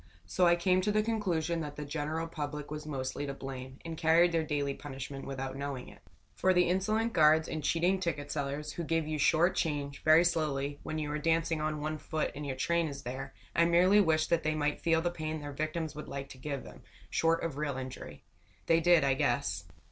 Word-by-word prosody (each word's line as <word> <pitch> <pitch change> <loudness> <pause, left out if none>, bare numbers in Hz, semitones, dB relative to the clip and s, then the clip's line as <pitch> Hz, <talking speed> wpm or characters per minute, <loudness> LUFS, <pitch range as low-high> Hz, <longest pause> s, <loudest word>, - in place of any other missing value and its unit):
So 175 - +2
I 170 - +6
came 185 +1 +2
to 210 +3 +1
the 215 0 +2
conclusion 175 -7 0
that 150 -2 -5
the 150 - -5
general 155 +2 -3
public 150 -2 -5
was 150 0 -5
mostly 140 0 -3
to 140 - -4
blame, 130 -1 -7
and 165 -1 -4
carried 165 +2 +4
their 165 -1 +1
daily 145 -2 -1
punishment 135 -1 -7
without 135 -1 -4
knowing 140 -2 -5
it. - - -16 0.3
For 185 0 +2
the 180 0 +4
insolent 215 +5 +1
guards 155 0 +5
and 155 -1 -4
cheating 175 +5 +2
ticket 150 -6 -3
sellers 145 +1 -3
who 170 - -4
give 165 -1 0
you 155 -1 -2
short 165 +5 +4
change, 145 -3 -2
very 155 +2 +6
slowly, 145 -4 0
when 155 - -4
you 150 -1 -2
are 150 - -2
dancing 165 0 +1
on 155 0 -1
one 155 +1 -3
foot 155 +1 -2
and 145 0 -6
your 135 - -2
train 170 +5 +1
is 140 -1 -7
there, 130 +1 -6 0.2
I 170 - +5
merely 180 +4 +5
wished 155 -4 +2
that 170 -1 +3
they 155 0 0
might 150 -1 -1
feel 165 -1 +2
the 175 - 0
pain 155 -2 -4
their 145 -1 -6
victims 155 +1 -3
would 150 0 -8
like 140 0 -6
to 130 - -11
give 140 0 -4
them, - - -12 0.3
short 165 0 +2
of 155 -4 -3
real 145 -3 -2
injury. 130 0 -7 0.4
They 165 0 +4
did, 170 -2 +5
I 135 -1 +3
guess. 120 -10 0
155 Hz, 220 wpm, -31 LUFS, 140-165 Hz, 0.4 s, I